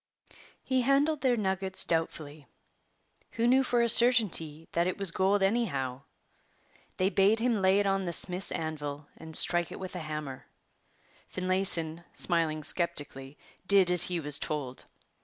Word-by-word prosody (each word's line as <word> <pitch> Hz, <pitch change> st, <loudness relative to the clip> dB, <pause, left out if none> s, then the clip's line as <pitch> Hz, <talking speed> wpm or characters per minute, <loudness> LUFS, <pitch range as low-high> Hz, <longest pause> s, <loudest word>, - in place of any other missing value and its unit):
He 260 Hz, -1 st, 0 dB
handled 280 Hz, +4 st, +1 dB
their 250 Hz, -3 st, +1 dB
nuggets 190 Hz, -2 st, -3 dB
doubtfully. 155 Hz, -3 st, -4 dB, 0.9 s
Who 230 Hz, -, -1 dB
knew 260 Hz, +2 st, +3 dB
for 240 Hz, -2 st, 0 dB
a -, -, +1 dB
certainty 210 Hz, -11 st, +2 dB
that 170 Hz, +1 st, 0 dB
it 185 Hz, -, -3 dB
was 195 Hz, -3 st, +1 dB
gold 195 Hz, +2 st, 0 dB
anyhow? 140 Hz, -, -2 dB, 1.0 s
They 185 Hz, +2 st, 0 dB
bade 205 Hz, +3 st, +2 dB
him 230 Hz, -3 st, -1 dB
lay 190 Hz, +1 st, +3 dB
it 205 Hz, -, 0 dB
on 195 Hz, -1 st, -1 dB
the 175 Hz, -, -3 dB
smith's 180 Hz, +2 st, +2 dB
anvil 150 Hz, -2 st, -6 dB
and 160 Hz, -1 st, -10 dB
strike 175 Hz, -1 st, +4 dB
it -, -, -9 dB
with 185 Hz, -1 st, -8 dB
a -, -, -5 dB
hammer. 150 Hz, -4 st, -7 dB, 0.8 s
Finlayson, 185 Hz, -3 st, -1 dB
smiling 160 Hz, -3 st, 0 dB
sceptically, 145 Hz, -4 st, -3 dB, 0.3 s
did 195 Hz, -3 st, +4 dB
as 180 Hz, -2 st, +9 dB
he 180 Hz, -1 st, -3 dB
was 150 Hz, -2 st, +1 dB
told. 135 Hz, -4 st, -6 dB
180 Hz, 150 wpm, -28 LUFS, 155-200 Hz, 1.0 s, as